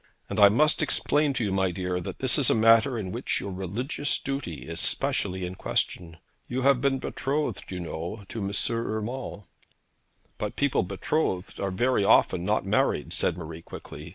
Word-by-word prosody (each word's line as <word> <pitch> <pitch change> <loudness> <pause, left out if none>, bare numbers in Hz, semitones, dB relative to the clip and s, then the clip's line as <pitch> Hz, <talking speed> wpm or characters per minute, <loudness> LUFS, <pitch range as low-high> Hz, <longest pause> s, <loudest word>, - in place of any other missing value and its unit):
And - - -1
I 100 -1 +9
must 150 +9 +3
explain 150 -1 +2
to 120 - -1
you, 100 - -1
my 95 -1 +2
dear, 90 0 -2
that - - -6
this 130 +2 +2
is 135 - +3
a - - +4
matter 115 +3 +5
in 95 -4 -4
which - - -1
your 100 - -5
religious 110 - -2
duty 120 - -4
is 85 0 -4
specially 90 0 +1
in 90 - -5
question. 85 -2 -2 0.3
You 125 +1 -2
have 135 -2 +4
been 135 -1 +2
betrothed, 135 -6 -2
you 90 - -5
know, 85 +5 -5
to 115 - -5
M. 100 - -2 0.3
Urmand.' 115 0 -4 1.0
'But 105 - -3
people 140 -2 +2
betrothed 95 - -2
are 100 - -1
very 120 +4 +1
often - - +4
not - - 0
married,' - - +1
said - - +1
Marie 80 -1 -7
quickly. 75 -1 -10
105 Hz, 180 wpm, -27 LUFS, 90-130 Hz, 1.0 s, I